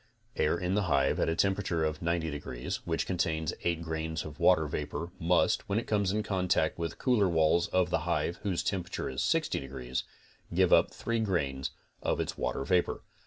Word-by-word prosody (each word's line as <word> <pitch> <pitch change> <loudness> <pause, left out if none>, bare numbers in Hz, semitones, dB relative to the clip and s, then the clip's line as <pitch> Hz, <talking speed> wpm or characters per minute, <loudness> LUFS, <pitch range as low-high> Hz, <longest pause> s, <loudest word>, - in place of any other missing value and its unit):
Air 80 +3 +2
in 90 +1 -1
the 105 - +2
hive 70 -2 +2
at - - +2
a 80 - 0
temperature 95 -4 +1
of 75 0 -2
90 85 -1 0
degrees 65 -4 -4
which 80 -1 0
contains 80 -4 -1
8 85 -1 0
grains 80 -1 -3
of 75 -2 -9
water 80 -4 +5
vapor 75 +3 -4
must, 85 +1 +2
when 100 - +1
it 115 - -1
comes 100 -3 +1
in 105 +1 0
contact 90 -6 +1
with 85 -1 -1
the - - -20
cool 120 -7 +3
walls 85 +1 +3
of 90 -1 +1
the - - +2
hive 85 +2 -1
whose 95 -4 -1
temperature 95 -8 -2
is 65 - -2
60 - - +1
degrees, 65 -2 -4 0.5
give - - +3
up - - +6
3 115 0 -2
grains 70 -11 -1 0.3
of - - 0
its - - -2
water 70 - -2
vapor. 90 -2 +1
85 Hz, 195 wpm, -30 LUFS, 75-95 Hz, 0.5 s, up